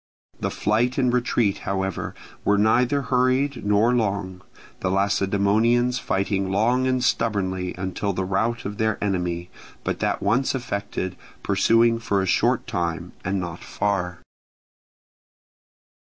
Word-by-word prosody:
The - - -1
flight 115 +4 0
and 125 -3 +2
retreat, 120 -4 +1
however, 95 -1 -3 0.3
were 105 - +3
neither 125 +6 +3
hurried 130 +2 +1
nor 105 +4 +3
long; 100 -5 -1 0.4
the 95 - -1
Lacedaemonians 100 +5 +2
fighting 95 -2 -1
long 120 +6 +2
and 130 -1 +1
stubbornly 95 -5 0
until 95 +2 -2
the 95 0 -2
rout 110 +5 -1
of 105 +1 -5
their 110 -1 +1
enemy, 90 -3 -2 0.3
but - - -2
that - - 0
once 120 +7 +1
effected, 100 -6 -3 0.3
pursuing 115 +4 +3
for 100 -3 0
a 95 - 0
short 90 - +2
time 85 0 -3
and 95 +1 -1
not 85 -1 -6
far. 95 -3 -2
100 Hz, 125 wpm, -24 LUFS, 95-120 Hz, 0.4 s, were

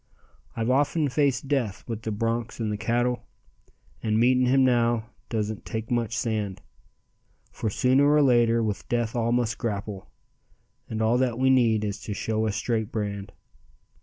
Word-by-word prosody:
"I've 115 +2 0
often 145 +3 +2
faced 140 -2 +1
death 130 -9 -1
with 115 -2 -4
the 110 - -3
bronks 115 +3 -2
and 110 -2 -1
the 105 - -2
cattle, 120 +3 0 0.8
And 110 0 +1
meeting 125 +1 +4
him 135 +1 +4
now 120 -2 +1 0.2
doesn't 110 -2 -2
take 110 0 -5
so - - 0
much 120 -1 -1
sand. 105 -4 -2 0.9
For 110 - -3
sooner 130 +6 +3
or 150 0 +5
later 120 -3 +4
with 105 -2 -3
death 120 -1 -1
all 115 -1 +1
must 120 -3 0
grapple, 100 -3 -4 0.8
And 110 0 -2
all 115 +3 +3
that 125 -3 0
we 130 +1 +3
need 115 -4 +3
is 100 -1 -3
to 105 - -5
show 110 +1 -1
a - - 0
straight 110 +1 -2
brand. 100 -2 -4
115 Hz, 165 wpm, -26 LUFS, 110-125 Hz, 0.9 s, or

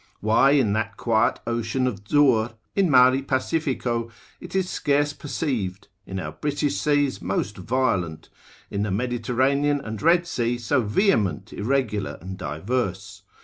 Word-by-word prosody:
Why 115 +6 +4
in 125 -8 +3
that 110 +1 -2
quiet 115 0 +1
ocean 120 +2 -1
of 105 -5 -4
Zur, 125 -6 +3 0.2
in 195 -3 +3
mari 130 0 +6
pacifico, 130 -4 -1 0.3
it - - -9
is 190 -1 +1
scarce 145 -3 +1
perceived, 120 - -3 0.2
in 95 0 -4
our - - -5
British 145 -1 -2
seas 145 -2 +1
most 95 +2 -2
violent, 95 -6 -1 0.4
in 100 - -2
the 105 - -1
Mediterranean 125 +6 +1
and 110 -5 -6
Red 175 +2 +4
Sea 120 -7 -1
so 120 +3 +1
vehement, 105 - +1
irregular, 110 -3 -1
and 95 +3 -7
diverse? 95 - -3
120 Hz, 140 wpm, -24 LUFS, 105-140 Hz, 0.4 s, mari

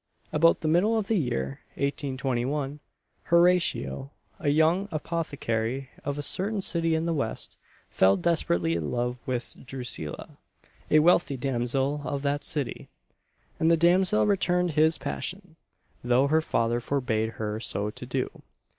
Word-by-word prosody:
About 165 +2 +4
the 155 - -1
middle 190 +8 +3
of 210 -3 -1
the 225 - +3
year 70 - -2 0.2
1821, 135 0 -2 0.5
Horatio, 170 -5 +2 0.3
a 145 - 0
young 160 +7 +3
apothecary, 135 -6 -2
of 145 0 -3
a 145 - -2
certain 195 +9 -1
city 165 -3 +1
in 160 +1 -1
the 170 - 0
West, 135 -8 -3 0.3
fell 95 +1 +3
desperately 85 - +1
in 85 -3 -2
love 125 0 -2
with 125 -2 -3
Drusilla, 125 - -4 0.5
a 155 - +5
wealthy 155 -3 +4
damsel 135 +3 -1
of 140 0 -3
that 145 0 0
city; 145 -5 -3 0.7
and 160 - +3
the 165 - +5
damsel 180 +5 +4
returned 180 -3 +2
his 155 +2 +3
passion, 185 -3 -5 0.5
though 125 +2 +3
her 155 +3 +3
father 115 -5 0
forbade 115 -4 -1
her 105 0 -3
so 105 -2 -1
to - - -8
do. - - -3
145 Hz, 140 wpm, -27 LUFS, 120-165 Hz, 0.7 s, a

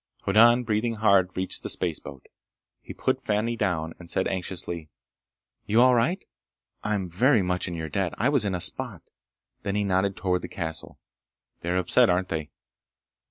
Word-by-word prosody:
Hoddan, 120 +5 +5
breathing 115 +1 0
hard, 100 -4 +3
reached 95 0 -1
the - - -5
spaceboat. 70 -1 -3 0.6
He - - -10
put - - -1
Fani 110 +3 0
down 85 -7 -1
and 85 -1 -12
said 95 - 0
anxiously: 85 -3 -4 0.8
"You're 115 +4 +5
all 130 0 +6
right? 155 +11 +1 0.6
I'm 105 -3 -1
very 110 - +3
much 90 +1 -1
in 85 - -4
your 80 -1 -4
debt! 90 +3 -2
I 125 - +1
was 140 -6 +2
in 100 -3 -1
a 90 - -3
spot!" - - 0 0.6
Then 100 -1 -3
he 105 - +1
nodded 95 0 0
toward 90 -1 0
the - - -6
castle. 80 -4 -5 0.6
"They 85 - -5
are 90 - +1
upset, 90 - +4
aren't 90 +1 +1
they? 80 -2 -3
95 Hz, 170 wpm, -26 LUFS, 90-110 Hz, 0.8 s, all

